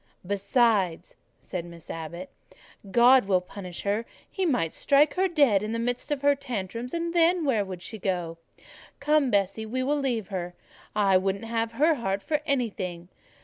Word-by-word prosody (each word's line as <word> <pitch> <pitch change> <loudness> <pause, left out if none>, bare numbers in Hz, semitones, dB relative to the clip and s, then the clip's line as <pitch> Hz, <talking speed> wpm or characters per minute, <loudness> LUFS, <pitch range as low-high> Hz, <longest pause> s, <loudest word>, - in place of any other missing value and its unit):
"Besides," 200 -3 +1 0.2
said 180 -2 -5
Miss 170 -1 -12
Abbot, 170 +3 -7 0.6
"God 245 +3 +6
will 190 -2 +3
punish 180 -1 -8
her: 210 +3 -1 0.2
He 380 -3 -2
might 245 - 0
strike 290 +1 +3
her 380 +1 +2
dead 285 - +3
in 215 +1 -3
the - - -1
midst 245 +1 -2
of 290 -2 -2
her 285 0 +5
tantrums, 235 -3 -5
and 335 0 -2
then 340 0 +3
where 230 -7 +2
would 185 -2 -8
she 220 - -7
go? 175 -3 -2 0.6
Come, 295 -1 +2
Bessie, 200 +1 0
we 255 +3 -2
will 290 +3 +1
leave 240 -7 -2
her: 180 -2 -4 0.4
I 200 -3 +4
wouldn't 195 +3 -1
have 225 0 -2
her 305 +7 +3
heart 200 -7 -2
for 300 -2 -1
anything. 195 - -2
225 Hz, 170 wpm, -26 LUFS, 190-275 Hz, 0.6 s, God